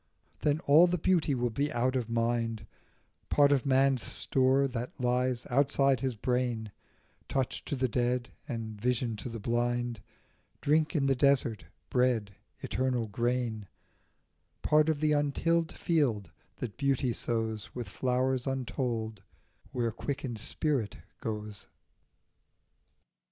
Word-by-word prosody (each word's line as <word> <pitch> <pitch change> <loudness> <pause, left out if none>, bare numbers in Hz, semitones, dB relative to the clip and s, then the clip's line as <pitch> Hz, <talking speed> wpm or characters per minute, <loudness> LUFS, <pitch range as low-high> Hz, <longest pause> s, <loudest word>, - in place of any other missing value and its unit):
Then 150 +1 +1
all 160 +3 +6
the 180 +1 0
beauty 165 -4 +2
will 120 -1 0
be 145 +6 -1
out 130 +1 +1
of 120 -3 -1
mind, 115 -1 0 0.6
Part 145 -1 +5
of 140 -1 +2
man's 135 -1 +3
store, 135 +3 +2
that 125 -1 -5
lies 125 0 0
outside 135 0 +3
his 130 -1 -2
brain, 120 -2 -1 0.6
Touch 130 -2 -1
to - - -2
the 130 -1 +1
dead 125 +1 0 0.2
and 110 -5 -5
vision 120 -1 0
to 105 - -6
the 115 0 -6
blind, 120 0 -1 0.6
Drink 155 +3 +2
in 140 -3 +2
the 135 - +4
desert, 130 -5 +2 0.3
bread, 125 -5 +2 0.3
eternal 125 -3 -1
grain, 120 -1 -1 1.0
Part 155 +1 +4
of 155 -2 0
the 155 -1 +3
untilled 160 +3 +1
field 130 - 0 0.2
that 120 -5 -6
beauty 135 -3 +1
sows 110 -1 -3
With 120 -3 -4
flowers 130 +5 0
untold, 120 -5 -2 0.5
where 120 -2 0
quickened 130 -1 -4
spirit 130 - -1 0.2
goes. 105 -2 -5
125 Hz, 125 wpm, -30 LUFS, 115-140 Hz, 1.0 s, all